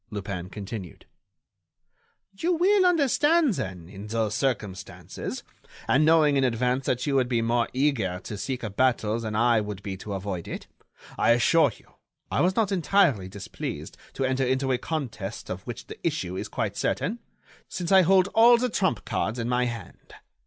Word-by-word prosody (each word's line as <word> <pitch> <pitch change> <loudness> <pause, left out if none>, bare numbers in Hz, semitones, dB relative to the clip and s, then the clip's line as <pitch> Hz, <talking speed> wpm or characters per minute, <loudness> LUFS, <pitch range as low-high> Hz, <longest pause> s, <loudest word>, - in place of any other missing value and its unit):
Lupin 95 -4 -5
continued: 100 -2 -8 1.3
"You 340 - 0
will 370 +3 +4
understand 305 -2 +3
then, 90 - -5
in 100 +3 -9
those 110 -1 -1
circumstances, 105 -9 -4 0.4
and 140 +4 +4
knowing 155 -2 +4
in 135 - +2
advance 125 +2 0
that 125 0 0
you 145 - 0
would 130 -2 +2
be 115 -2 +1
more 115 +1 +1
eager 125 -10 0
to 105 - -6
seek 125 +5 -4
a 110 - -3
battle 115 -1 +1
than 110 -2 -4
I 115 0 +3
would 105 -2 -6
be 95 -1 -4
to 100 +2 -6
avoid 95 -3 -4
it, - - -6 0.5
I 115 - +5
assure 140 +4 +4
you - - -22 0.5
I - - +1
was 185 +2 +2
not 215 -3 +1
entirely 175 - +2
displeased 100 0 -6 0.2
to 135 - -1
enter 130 0 0
into 130 +1 0
a 125 - +1
contest 125 -11 -5
of - - -5
which - - -6
the - - -10
issue 90 +1 -2
is - - -4
quite - - -3
certain, 225 +5 -1 0.5
since 175 -1 -4
I 190 -1 +8
hold 185 +1 +4
all 235 +3 +6
the 250 +1 0
trump 180 - 0
cards 110 +2 -2
in 115 -1 -2
my 125 0 +1
hand. 120 -1 -8
125 Hz, 175 wpm, -26 LUFS, 105-165 Hz, 1.3 s, I